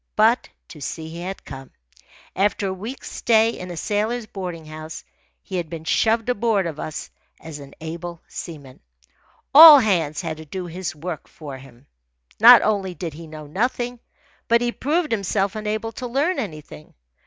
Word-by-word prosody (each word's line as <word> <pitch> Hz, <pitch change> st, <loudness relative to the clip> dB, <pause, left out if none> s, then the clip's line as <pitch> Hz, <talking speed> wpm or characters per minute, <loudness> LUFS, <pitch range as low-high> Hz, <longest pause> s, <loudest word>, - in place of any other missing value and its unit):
But 225 Hz, +3 st, +3 dB, 0.2 s
to 150 Hz, -, -12 dB
sea 160 Hz, +3 st, -5 dB
he 170 Hz, +1 st, -8 dB
had 190 Hz, +2 st, -6 dB
come. 135 Hz, -1 st, -9 dB, 0.7 s
After 200 Hz, 0 st, +1 dB
a -, -, -2 dB
week's 220 Hz, +8 st, -7 dB
stay 225 Hz, -1 st, +3 dB
in 180 Hz, -5 st, -8 dB
a 175 Hz, -, -7 dB
sailors' 215 Hz, +5 st, -1 dB
boarding 180 Hz, -6 st, -6 dB
house, 155 Hz, +1 st, -8 dB, 0.4 s
he 190 Hz, -, -5 dB
had 170 Hz, -3 st, -3 dB
been 160 Hz, -1 st, -7 dB
shoved 225 Hz, +7 st, +1 dB
aboard 225 Hz, -5 st, +1 dB
of 155 Hz, -3 st, -5 dB
us 155 Hz, -, -6 dB, 0.3 s
as 160 Hz, -2 st, -9 dB
an 140 Hz, -1 st, -12 dB
able 170 Hz, +1 st, -6 dB
seaman. 145 Hz, -6 st, -9 dB, 0.7 s
All 310 Hz, +1 st, +12 dB
hands 175 Hz, -, +1 dB
had 160 Hz, -3 st, -4 dB
to 160 Hz, -, -10 dB
do 180 Hz, +4 st, -6 dB
his 175 Hz, -1 st, -5 dB
work 160 Hz, +1 st, -6 dB
for 140 Hz, -4 st, -9 dB
him. 130 Hz, -1 st, -17 dB, 0.5 s
Not 240 Hz, +2 st, +9 dB
only 195 Hz, -4 st, 0 dB
did 170 Hz, -4 st, -5 dB
he 165 Hz, +2 st, -10 dB
know 155 Hz, -1 st, -9 dB
nothing, 240 Hz, -, -2 dB, 0.5 s
but 235 Hz, 0 st, +4 dB
he 240 Hz, 0 st, 0 dB
proved 305 Hz, +6 st, -1 dB
himself 200 Hz, -2 st, 0 dB
unable 215 Hz, +1 st, -3 dB
to 245 Hz, +3 st, -6 dB
learn 285 Hz, +9 st, 0 dB
anything. 155 Hz, -, -8 dB
185 Hz, 170 wpm, -22 LUFS, 160-225 Hz, 0.7 s, All